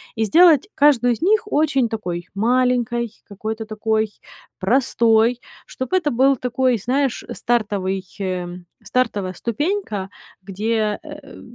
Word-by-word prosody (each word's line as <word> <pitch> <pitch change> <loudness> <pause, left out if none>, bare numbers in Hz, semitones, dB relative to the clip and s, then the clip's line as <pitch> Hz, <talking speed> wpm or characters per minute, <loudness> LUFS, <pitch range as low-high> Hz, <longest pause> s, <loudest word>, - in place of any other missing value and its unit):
И 225 - 0
сделать 325 - +5
каждую 255 -4 +4
из 230 - -8
них 425 +6 +3
очень 285 -5 +2
такой 180 -6 -4
маленькой, 240 +1 +1 0.2
какой-то 220 +2 -5
такой 220 0 -1 0.5
простой, 230 +1 +2 0.3
чтоб 260 -1 -6
это 345 -6 +1
был 265 +2 +3
такой, 250 0 +1
знаешь, 255 +5 -1
стартовый, 200 -5 -1
э, 185 -2 -2 0.4
стартовая 210 -4 -1
ступенька, 235 - -2 0.3
где, 210 +2 -1
э, 295 -3 -11
235 Hz, 115 wpm, -21 LUFS, 210-260 Hz, 0.5 s, сделать